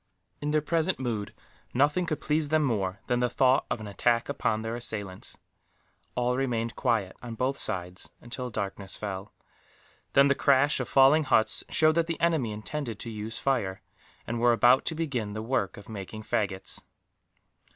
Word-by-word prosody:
In 145 - -2
their 150 0 +2
present 165 +2 0
mood, 115 -6 -3 0.4
nothing 150 +7 +2
could 155 -2 -1
please 150 -1 +1
them 155 0 +3
more 100 -7 -1
than 120 0 +1
the 125 0 +2
thought 130 +2 +3
of - - -1
an 110 - -7
attack 115 +5 +1
upon 110 -5 0
their 115 +1 -3
assailants. 105 -5 -5 0.8
All 125 0 +1
remained 120 -3 -1
quiet, 110 -7 0
on 120 -2 -6
both 130 +4 0
sides, 90 -7 0
until 125 +1 -6
darkness 100 -3 -4
fell; 100 -1 -5 0.8
then 140 0 +6
the 140 - +4
crash 140 +1 +3
of - - -3
falling 140 +3 +6
huts 110 -5 +2
showed 155 0 +4
that 165 0 +1
the 165 - -3
enemy 160 -9 +1
intended 115 +2 -4
to 115 - -5
use 110 +1 -5
fire, 115 -9 -1 0.4
and 120 0 -3
were 120 0 +5
about 120 +4 +5
to 160 - -1
begin 130 -10 -2
the 110 +1 -4
work 120 -4 -1
of 100 - -12
making 110 0 -7
faggots. 95 -3 -1
120 Hz, 170 wpm, -28 LUFS, 105-140 Hz, 0.8 s, then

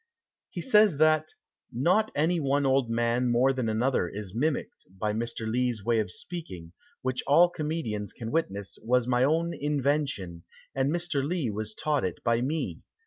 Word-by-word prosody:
He - - -5
says, 210 - +4
that 155 0 +4 0.4
"Not 180 - +2
any 165 +4 +2
one 140 -1 +1
old 135 -2 +2
man 120 +2 +1
more 125 +3 +3
than 125 -4 -1
another 110 -4 +1
is 100 -1 -7
mimiqued, 145 +4 -2
by 105 +2 -1
Mr. 115 0 -3
Lee's 120 -2 -1
way 115 -1 +2
of 105 - -1
speaking, 90 - -8 0.3
which 130 0 -1
all 170 +5 +6
comedians 150 - -3
can 115 -1 -7
witness, 100 -11 -2
was 125 +1 +2
my 125 0 +2
own 165 +4 +1
invention, 140 - -1 0.3
and 135 0 +1
Mr. 170 -5 -1
Lee 150 -5 -1
was 110 +1 -4
taught 150 -2 0
it 90 -3 -4
by 115 0 +2
me. 150 +5 -2
130 Hz, 165 wpm, -28 LUFS, 110-155 Hz, 0.4 s, all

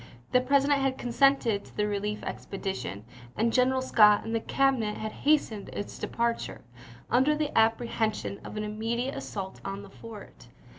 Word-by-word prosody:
The 250 - +4
President 280 +2 +3
had 270 -1 0
consented 245 -4 +2
to - - -17
the 210 - +2
relief 210 +1 -2
expedition, 125 - -5 0.3
and 225 +1 +1
General 260 +1 +3
Scott 210 -5 +6
and 225 - -3
the 230 - +2
Cabinet 245 -4 +1
had 215 0 -4
hastened 280 -9 +1
its 205 - -6
departure, 235 0 -2 0.5
under 265 +5 +4
the 300 -1 -2
apprehension 225 -2 +1
of - - -8
an 210 - -2
immediate 225 +5 -2
assault 190 -2 -6
on 195 +1 -5
the 200 - -13
fort. 220 -1 -12
225 Hz, 155 wpm, -28 LUFS, 210-260 Hz, 0.5 s, Scott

